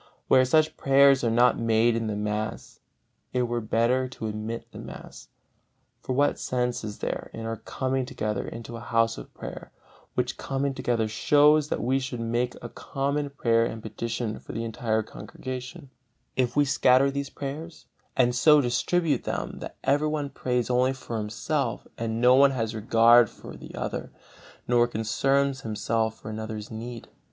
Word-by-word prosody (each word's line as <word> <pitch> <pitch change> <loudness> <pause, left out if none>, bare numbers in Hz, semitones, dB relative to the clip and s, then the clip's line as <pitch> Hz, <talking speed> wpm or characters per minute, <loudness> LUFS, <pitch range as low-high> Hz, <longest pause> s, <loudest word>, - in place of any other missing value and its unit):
Where 130 -1 +5
such 155 +4 +2
prayers 135 -1 +5
are 115 - +2
not 120 +2 +4
made 115 0 +3
in 115 -1 -1
the 105 - -2
mass, 105 +1 -4 0.5
it 125 -1 +2
were 120 0 -1
better 115 +4 +1
to 125 -3 -7
omit 110 +2 -4
the - - -10
mass. - - -10 0.7
For 130 - -3
what 145 +3 +2
sense 125 -2 -1
is 105 -1 -6
there - - -4
in 115 0 -6
our 115 0 -3
coming 130 +1 -2
together 110 -6 -3
into 115 0 -7
a - - -6
House 115 0 +1
of - - -11
Prayer, - - -8 0.4
which - - -1
coming 135 0 -1
together 120 -4 0
shows 150 +6 +4
that - - -2
we 130 +3 +2
should 130 -2 -5
make 120 +2 -1
common 140 +1 -2
prayer 115 -4 +2
and 110 -1 -4
petition 110 0 -4
for - - -10
the 115 - -3
entire 110 -1 -1
congregation, 130 +6 -8 0.4
if 125 -2 0
we 145 0 +4
scatter 135 0 +4
these 140 0 -3
prayers, 155 +4 -7 0.3
and 125 -1 +4
so 150 +4 +6
distribute 145 +3 +1
them - - -3
that - - -8
everyone 145 +1 +1
prays 125 -1 -1
only 125 +2 +3
for 120 -3 -5
himself, 110 +3 -2
and 115 0 -3
no 125 +1 +6
one 140 +2 +7
has 115 -4 -2
regard 115 +2 +5
for - - -11
the - - -11
other, - - -4 0.6
nor 120 -1 +4
concerns 135 +5 0
himself 110 0 -1
for 110 - -7
another's 110 0 -6
need? 115 +1 -7
120 Hz, 165 wpm, -26 LUFS, 115-135 Hz, 0.7 s, one